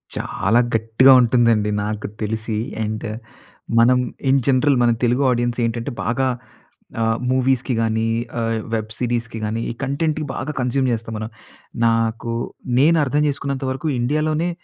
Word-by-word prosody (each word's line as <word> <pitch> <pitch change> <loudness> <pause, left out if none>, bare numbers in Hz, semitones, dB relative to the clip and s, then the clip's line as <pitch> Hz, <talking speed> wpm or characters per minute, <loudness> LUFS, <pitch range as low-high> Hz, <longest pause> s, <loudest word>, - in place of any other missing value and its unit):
చాలా 110 +5 +1 0.2
గట్టిగా 115 +4 +5
ఉంటుందండి 115 -3 +3
నాకు 105 0 -3
తెలిసి. 110 0 -2 0.3
అండ్ 110 +1 -4 0.7
మనం 125 +2 +5 0.3
ఇన్ 135 0 +4
జనరల్ 135 +1 +3
మన 120 - +4
తెలుగు 125 +3 +1
ఆడియన్స్ 120 0 -1
ఏంటంటే 115 0 -3
బాగా 130 +3 +1 0.7
ఆ! - - +2 0.3
మూవీస్‌కి 130 0 +1
గాని 110 0 0 0.3
ఆ! - - 0 0.3
వెబ్ 110 -1 -2
సీరీస్‌కి 120 -2 -2
గాని 110 +2 -2
ఈ - - -5
కంటెంట్‌కి 150 +3 -1
బాగా 130 +5 -3
కన్జ్యూమ్ 130 +1 +1
చేస్తాం 115 0 -4
మనం. 110 +1 -5 0.6
నాకు 115 0 0 0.5
నేను 165 +4 +5
అర్థం 145 +2 +1
చేసుకున్నంత 140 -1 -3
వరకు 135 +4 -3
ఇండియాలోనే 155 +6 0
120 Hz, 135 wpm, -20 LUFS, 115-135 Hz, 0.7 s, గట్టిగా